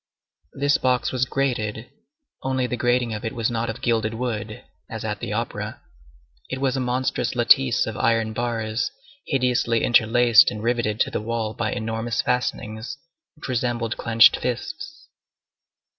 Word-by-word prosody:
This 145 +1 +2
box 125 -1 +1
was 130 -1 +1
grated, 120 -4 -2 0.5
only 130 -1 0
the 125 - -2
grating 120 -1 +1
of 105 - -5
it 115 - -4
was 115 0 0
not 115 0 -2
of 115 - -6
gilded 115 -2 +1
wood, 115 -3 -4 0.3
as - - -6
at - - -3
the - - -5
opera; - - -3 0.7
it 130 - -4
was 135 -1 0
a - - -1
monstrous 130 +1 -1
lattice 65 - +4
of - - -5
iron 115 -1 +1
bars, 115 -1 -2 0.4
hideously 125 -3 +1
interlaced 120 -2 +5
and 105 +1 -6
riveted 115 -3 0
to - - +1
the - - -2
wall 110 -1 -2
by 110 0 -2
enormous 115 0 -3
fastenings 120 0 -2 0.4
which 150 - -9
resembled 120 -2 -1
clenched 115 0 +5
fists. 160 - -5
120 Hz, 150 wpm, -23 LUFS, 110-125 Hz, 0.7 s, interlaced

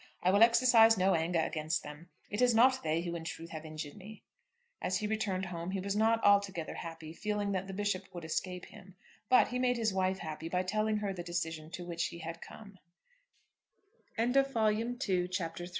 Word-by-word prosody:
I 180 - +4
will 200 +2 +3
exercise 230 -1 +6
no 190 +1 +3
anger 165 +1 +1
against 155 -1 -2
them. 150 +3 -10 0.2
It 205 +4 -2
is 245 -2 +4
not 255 +3 +5
they 160 +1 0
who 170 -1 -4
in 170 -1 -5
truth 165 0 -7
have 160 -1 -7
injured 155 -2 -6
me." 210 +3 -12 0.6
As 185 - 0
he 210 - -3
returned 210 -3 -1
home 170 -1 -5
he 195 0 -2
was 200 +1 -2
not 225 +1 +2
altogether 200 -5 +2
happy, 165 -1 -8
feeling 210 +2 -2
that 190 0 -2
the 195 - -6
Bishop 200 -2 -2
would 175 -2 -7
escape 180 +3 -3
him; 195 -3 -15 0.3
but 255 - +5
he 250 +2 -2
made 250 -1 +2
his 220 -3 0
wife 190 0 +1
happy 160 -1 -6
by 180 +1 0
telling 215 +3 0
her 205 -2 -2
the 180 - -6
decision 165 -2 -4
to 175 0 -6
which 170 -1 -2
he 170 - -9
had 165 0 -7
come. 200 -3 -12 1.4
CHAPTER 245 +4 +3
IV. 275 -1 -1
"IT 225 +4 0
IS 180 0 0
IMPOSSIBLE." 170 0 -5
190 Hz, 205 wpm, -32 LUFS, 170-215 Hz, 1.4 s, exercise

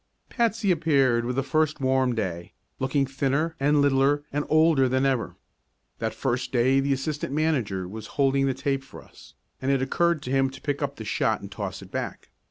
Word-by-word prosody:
Patsy 225 -4 +1
appeared 135 -8 +2
with 125 +1 -2
the 135 - 0
first 155 +3 0
warm 130 -2 +1
day, 90 -6 -4 0.3
looking 135 +1 +1
thinner 140 +4 -1
and 145 +1 +3
littler 140 +1 +3
and 145 +1 0
older 155 -4 +4
than 130 +1 +1
ever. 130 -6 0 0.6
That - - -2
first 125 -1 -2
day 130 +2 +3
the 140 +1 0
assistant 140 +1 -2
manager 125 - 0
was 110 +3 -8
holding 135 -1 +3
the 135 - 0
tape 135 0 -1
for 135 - -12
us, - - -18 0.3
and 130 - -1
it 135 -1 +3
occurred 170 +3 +1
to 125 - -5
him 135 0 +2
to 135 0 -12
pick 145 -1 -2
up 140 -1 -2
the 110 - -8
shot - - 0
and - - -9
toss - - -5
it - - -15
back. - - -5
135 Hz, 195 wpm, -25 LUFS, 130-145 Hz, 0.6 s, older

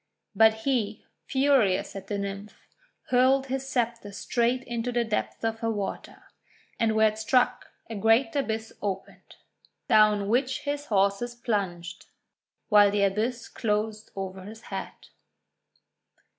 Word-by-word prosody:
But 220 +1 +5
he, 225 -6 -1 0.2
furious 255 -10 +2
at 195 -1 -7
the 205 - -2
Nymph, 200 +1 -6 0.5
hurled 260 +2 +4
his 270 0 -4
sceptre 235 -5 -2
straight 240 +4 0
into 240 0 -3
the 240 0 +1
depths 220 0 -3
of 225 0 -1
her 225 - -1
water. 205 -3 -5 0.6
And 225 -1 +2
where 220 0 +5
it 215 +1 -8
struck 245 +3 +1 0.2
a 225 - -7
great 225 +4 +2
abyss 225 -5 -2
opened, 195 -2 -6 0.5
down 210 -2 +4
which 255 +4 +1
his 290 0 -3
horses 200 +4 +1
plunged, 190 -6 -3 0.6
while 205 -2 +6
the 200 0 +1
abyss 220 +5 -1
closed 215 0 -2
over 190 -1 -5
his 215 +4 -10
head. 190 - -7
220 Hz, 130 wpm, -27 LUFS, 200-240 Hz, 0.6 s, while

